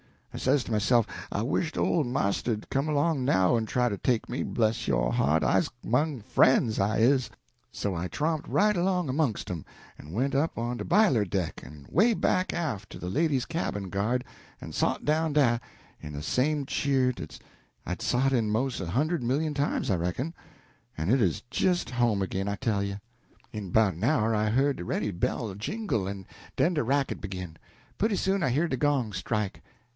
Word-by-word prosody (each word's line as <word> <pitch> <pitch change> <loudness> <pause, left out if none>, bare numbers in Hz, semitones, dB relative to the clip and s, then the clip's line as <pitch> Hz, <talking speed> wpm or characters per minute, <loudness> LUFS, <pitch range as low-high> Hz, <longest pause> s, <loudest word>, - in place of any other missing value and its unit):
I - - -5
says 140 -3 +2
to - - -8
myself, 115 +2 +3 0.3
I 100 - -1
wished 160 +6 -1
old 155 -7 +2
marster'd 110 -2 -1
come 135 +3 0
along 150 -1 +1
now 95 -4 +3
en 110 - -1
try 125 +2 +1
to 100 - -3
take 120 +3 0
me 125 - -2
bless 110 -1 0
yo' - - +1
heart, 75 +5 +2
I's 165 - +2
'mong 130 0 0
frien's, 115 0 +3
I 100 +3 +1
is. 130 +3 +3 0.4
So 100 - -2
I 85 +1 -2
tromped 155 - -2
right 210 +1 +3
along 180 -1 +1
'mongst 140 -11 -1
'em, 85 -4 -4 0.4
en 75 +3 -10
went 130 +7 0
up 145 +4 0
on 120 +1 -2
de - - -5
b'iler 175 - +4
deck 90 -4 -2
en 75 -2 -12
'way 225 +6 +4
back 185 -1 +1
aft 110 - -3
to - - -8
de 90 - -5
ladies' 140 - +1
cabin 100 - -3
guard, 110 +7 0 0.4
en - - -7
sot - - 0
down 155 +1 +1
dah 125 -6 +3 0.4
in 75 - -8
de 70 - -5
same 140 - +1
cheer 135 -2 +1
dat - - -8 0.5
I'd 90 +4 -4
sot 125 +4 +2
in 115 -5 +1
'mos' 120 +4 0
a 95 - -4
hund'd 155 - +1
million 145 +6 0
times, 140 -6 0
I 95 - +2
reckon; 90 - -2 0.6
en 80 +4 -2
it 130 0 +4
'uz 90 -6 +1
jist 180 +5 +1
home 120 -5 +1
ag'in, 95 +1 -2
I 100 - -1
tell 110 -4 0
you! 100 0 -3 0.5
"In 105 -4 -6
'bout 100 -2 +3
an 90 - -7
hour 115 -5 +2
I 105 0 +1
heard 135 +5 +2
de 90 - -6
ready 105 - -1
bell 100 +4 -2
jingle, 115 - -2
en 100 -1 -6 0.3
den 175 - +2
de 150 - +1
racket 135 +3 0
begin. 90 -5 -6 0.4
Putty 215 0 +2
soon 195 0 0
I 135 - +2
hear 155 +7 +1
de 130 - -1
gong 140 -5 +1
strike. 100 +2 -2
120 Hz, 195 wpm, -28 LUFS, 100-145 Hz, 0.6 s, b'iler